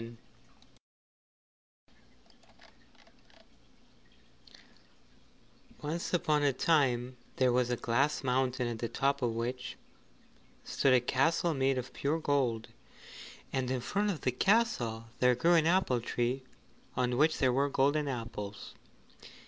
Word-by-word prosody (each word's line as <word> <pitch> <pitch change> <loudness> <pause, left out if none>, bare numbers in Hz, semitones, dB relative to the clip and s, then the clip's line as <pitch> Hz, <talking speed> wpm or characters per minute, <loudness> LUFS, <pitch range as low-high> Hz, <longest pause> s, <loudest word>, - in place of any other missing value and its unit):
Once 160 +3 -3
upon 155 -4 +1
a 145 -1 +3
time 130 -4 +1 0.2
there 130 -2 +2
was 125 0 +1
a 125 - +1
Glass 135 +8 0
Mountain 130 -1 0
at 115 -2 -4
the 115 - -3
top 140 +1 0
of 120 -2 0
which 125 +2 -4 0.9
stood 135 -2 +2
a - - +5
castle 160 +7 +1
made 135 -1 +1
of 125 0 -5
pure 145 +3 -1
gold, 130 -7 0 0.8
and 130 -1 -1
in 130 0 -1
front 200 +12 -1
of 175 -7 -3
the 125 - +1
castle 125 - +1
there 125 0 +4
grew 165 +8 +3
an 160 -2 +4
apple 170 -9 +2
tree 120 +3 -1 0.5
on 125 -1 0
which 155 +5 +3
there 130 -2 +2
were 140 +2 +1
golden 145 +2 +1
apples. 115 -5 -6
130 Hz, 115 wpm, -31 LUFS, 125-150 Hz, 0.9 s, a